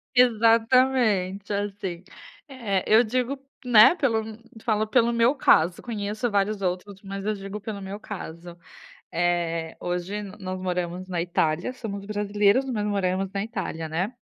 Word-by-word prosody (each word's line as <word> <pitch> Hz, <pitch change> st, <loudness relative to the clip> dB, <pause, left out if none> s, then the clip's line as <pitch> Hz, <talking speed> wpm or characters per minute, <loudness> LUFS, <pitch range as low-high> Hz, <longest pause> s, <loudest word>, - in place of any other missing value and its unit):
Exatamente, 230 Hz, -4 st, +3 dB
assim. 195 Hz, -3 st, -4 dB, 0.4 s
É, 225 Hz, -9 st, -2 dB
eu 220 Hz, +2 st, +7 dB
digo, 255 Hz, +4 st, -1 dB, 0.3 s
né, 245 Hz, +6 st, +7 dB
pelo 230 Hz, -9 st, +1 dB, 0.4 s
falo 215 Hz, -1 st, +1 dB
pelo 235 Hz, +1 st, +3 dB
meu 235 Hz, +3 st, +3 dB
caso, 175 Hz, -, +3 dB
conheço 215 Hz, 0 st, -3 dB
vários 200 Hz, 0 st, 0 dB
outros, 190 Hz, +2 st, -3 dB
mas 195 Hz, 0 st, -6 dB
eu 215 Hz, -, +1 dB
digo 195 Hz, 0 st, -6 dB
pelo 205 Hz, -1 st, -6 dB
meu 195 Hz, +2 st, -6 dB
caso. 175 Hz, -4 st, -8 dB, 0.5 s
Eh, 170 Hz, -1 st, -1 dB
hoje 180 Hz, +4 st, -3 dB
nós 190 Hz, -2 st, -6 dB
moramos 180 Hz, 0 st, -3 dB
na 180 Hz, -2 st, -2 dB
Itália, 170 Hz, +4 st, 0 dB
somos 200 Hz, -5 st, -6 dB
brasileiros, 205 Hz, +4 st, +2 dB
mas 220 Hz, -6 st, -2 dB
moramos 195 Hz, -2 st, 0 dB
na 195 Hz, -, -1 dB
Itália, 185 Hz, -7 st, -4 dB
né. 180 Hz, +9 st, -2 dB
200 Hz, 140 wpm, -25 LUFS, 185-225 Hz, 0.5 s, eu